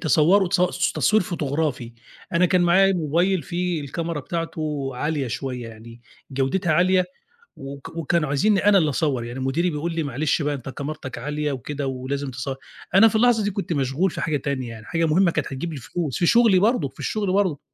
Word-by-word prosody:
تصوره 170 +5 +4
تص 180 -1 +1
تصوير 215 -2 +3
فوتوغرافي 145 -7 -2 0.4
أنا 175 +2 +4
كان 180 0 +2
معايا 190 +3 +5
mobile 175 +2 +1
فيه 175 -2 -2
الكاميرا 165 +2 -4
بتاعته 155 -3 -3
عالية 145 0 -1
شوية، 125 -1 -4
يعني 115 +1 -12 0.3
جودتها 140 +6 0
عالية 180 +2 +3 0.5
وك 140 +3 -9
وكانوا 165 -1 0
عايزني 195 +9 +2
أنا 200 -1 +6
اللي 155 -4 +2
أصوّر، 135 -5 0
يعني 120 +3 -6
مديري 165 +7 0
بيقول 160 +3 -3
لي 165 - -1
"معلش 150 +3 -1
بقى 145 0 0
أنت 135 -1 -7
كاميرتك 140 -1 -6
عالية 150 +3 -2
وكده 140 +2 -4
ولازم 135 +1 -3
تصو" 130 +2 -4 0.4
أنا 220 +4 +8
في 220 - -1
اللحظة 225 -2 +3
دي 205 - 0
كنت 195 -3 -4
مشغول 140 +6 0
في - - -6
حاجة 155 -2 0
تانية، 135 -3 -3
يعني 110 -1 -10
حاجة 165 -1 0
مهمة 170 +3 +3
كانت 155 -4 -2
هتجيب 140 +6 -4
لي - - -6
الفلوس 145 +2 -4
في 175 - +2
شغلي 230 -4 +5
برضه، 205 - +2
في - - -23
الشغل 205 -4 -1
برضه. 185 -7 +1
155 Hz, 190 wpm, -23 LUFS, 135-180 Hz, 0.5 s, أنا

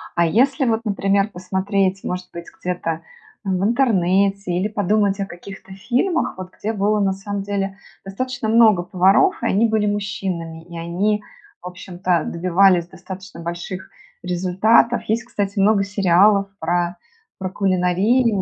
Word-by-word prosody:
А 170 - +3
если 265 - +2
вот, 230 -1 +1
например, 200 0 +1
посмотреть, 190 +1 -1
может 180 0 -4
быть, 170 0 -7
где-то 170 -3 -3 0.4
в 190 -1 -1
интернете 195 -5 +2
или 180 +4 0
подумать 205 -1 +1
о 195 - -1
каких-то 195 +1 -11
фильмах, 250 - -1
вот 185 0 -8
где 220 +2 -3
было 210 +1 +1
на 195 -1 +1
самом 195 +1 -5
деле 195 -1 -3 0.3
достаточно 240 +4 -4
много 220 -5 +5
поваров 195 - +3
и - - -3
они 220 +4 +3
были 220 -1 +1
мужчинами, 185 -5 -3
и 170 -1 -10
они 195 +6 -1 0.4
в - - -8
общем-то 180 -2 -2
добивались 180 0 +3
достаточно 190 0 -10
больших 175 +2 -6 0.3
результатов. 185 +7 +2
Есть, 225 +2 0
кстати, 205 -3 -3
много 200 0 +4
сериалов 200 0 +3
про 175 +1 -1 0.4
про 185 -1 -4
кулинарию 195 +4 +2
195 Hz, 140 wpm, -20 LUFS, 180-210 Hz, 0.4 s, много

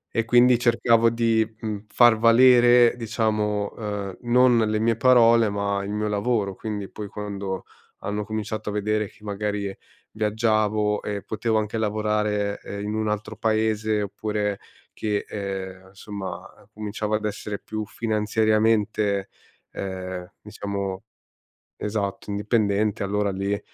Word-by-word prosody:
E 115 - +1
quindi 120 +1 +5
cercavo 115 -1 +4
di, 115 -1 +2 0.2
mhmm, 105 -1 -5
far 120 0 +5
valere, 120 +1 +6
diciamo, 105 -3 -1
ehm, 105 -3 -5
non 125 -1 +5
le 110 -1 +1
mie 115 0 +2
parole, 115 -3 +5
ma 100 -1 -1
il 100 - -5
mio 105 +1 -1
lavoro. 105 -1 0
Quindi, 105 -1 -5
poi, 105 -1 -7
quando 100 -2 -5 0.4
hanno 105 +1 -2
cominciato 110 0 -4
a 105 - -4
vedere 105 +1 0
che, 105 - -21
magari, 100 -1 -3 0.4
viaggiavo 105 -1 +1
e 100 -1 -4
potevo 110 +1 -1
anche 110 +1 -1
lavorare, 105 -1 0
eh, 100 - -7
in 105 +1 -3
un 110 0 -1
altro 105 +1 -3
paese 110 -1 0
oppure 105 0 -2 0.3
che, 105 -1 -2
ehm, 95 -2 -5
insomma, 100 0 -7 0.2
cominciavo 105 0 -3
ad 105 - -2
essere 105 0 -4
più 110 0 -5
finanziariamente, 110 -2 +1 0.4
ehm, 95 -1 -6
diciamo, 100 -2 -5 0.7
esatto, 105 -1 -3
indipendente, 105 -1 0
allora 100 0 0
lì 100 +2 -2
105 Hz, 130 wpm, -24 LUFS, 100-110 Hz, 0.7 s, valere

